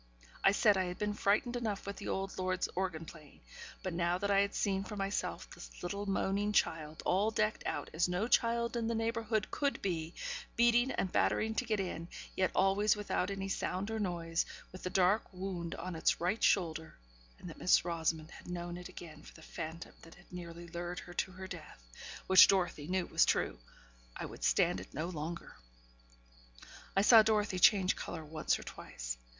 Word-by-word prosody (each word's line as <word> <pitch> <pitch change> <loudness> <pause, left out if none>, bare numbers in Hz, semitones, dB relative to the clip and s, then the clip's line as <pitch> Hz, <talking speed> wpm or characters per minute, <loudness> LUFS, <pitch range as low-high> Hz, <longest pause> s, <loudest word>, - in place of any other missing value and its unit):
I 195 - +7
said 205 0 +4
I 185 - +1
had 180 0 -5
been 210 0 -1
frightened 215 +5 +1
enough 220 -5 -2
with 200 0 -5
the 205 - -7
old 195 0 -2
lord's 185 0 0
organ 180 -4 -2
playing; 155 -3 -14 0.4
but 185 - -3
now 170 +1 +1
that 200 +2 -1
I 195 - +5
had 200 0 +1
seen 195 -2 0
for 210 - -7
myself 195 +1 -2
this - - -10
little 200 +3 -3
moaning 200 +1 0
child, 155 -5 0
all 200 +4 +3
decked 215 -1 0
out - - -2
as 170 +3 +2
no 180 +5 0
child 235 0 +2
in 230 -1 -1
the 230 - 0
neighbourhood 225 -1 -1
could 285 -1 0
be, 170 -3 -3 0.4
beating 240 +2 +4
and 190 -7 -1
battering 220 +1 +2
to 250 - -1
get 215 -3 0
in, 175 -3 -3 0.3
yet 185 -1 +2
always 200 +3 +3
without 205 -2 -1
any 195 -1 -3
sound 195 +1 -2
or 220 - -2
noise 170 -4 -1 0.3
with 185 - -10
the 185 - -3
dark 190 +2 +2
wound 180 -3 -4
on 180 0 -5
its 160 - +2
right 180 +6 0
shoulder; 160 -4 +1 0.4
and - - -10
that - - -9
Miss - - +4
Rosamond 165 -1 -1
had - - -13
known 175 0 -4
it 180 - -8
again 155 -3 -10
for - - -14
the 160 - -14
phantom 160 +1 -7
that 165 - -14
had 175 +1 -19
nearly 170 -1 -7
lured 175 +1 -5
her 175 - -8
to 185 - -1
her 190 0 -8
death 155 - -10 0.4
(which 190 -3 +9
Dorothy 175 -6 +1
knew 185 0 0
was - - +3
true); - - +1 0.6
I - - -4
would - - -9
stand - - +3
it 95 - -11
no 160 +5 -2
longer. 170 0 -6 1.4
I 195 - +5
saw 225 +1 +9
Dorothy 210 -3 +1
change 185 0 +5
colour 160 -2 -6
once 155 0 0
or - - -9
twice. - - -7
185 Hz, 195 wpm, -33 LUFS, 170-205 Hz, 1.4 s, which